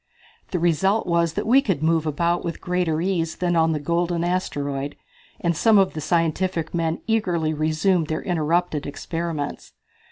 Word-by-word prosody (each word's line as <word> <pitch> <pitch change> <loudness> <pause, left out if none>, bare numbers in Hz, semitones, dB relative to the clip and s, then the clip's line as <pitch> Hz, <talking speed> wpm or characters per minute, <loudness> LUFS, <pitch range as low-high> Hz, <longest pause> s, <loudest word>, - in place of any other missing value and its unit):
The 180 - -1
result 175 +5 +2
was 170 -2 +1
that - - -2
we 260 +5 +5
could 190 - -1
move 160 -1 +2
about 170 +3 0
with 170 - -4
greater 175 -3 0
ease 170 -3 -1
than 175 -1 0
on 165 0 +3
the 155 - -1
golden 170 +2 0
asteroid, 145 -6 -2 0.4
and 170 -1 0
some 220 +6 +4
of 195 -1 +3
the 155 - -5
scientific 165 +1 0
men 165 -1 -1
eagerly 175 -8 0
resumed 155 +3 +1
their 155 0 -3
interrupted 165 -2 0
experiments. 165 0 -4
170 Hz, 160 wpm, -23 LUFS, 155-180 Hz, 0.4 s, we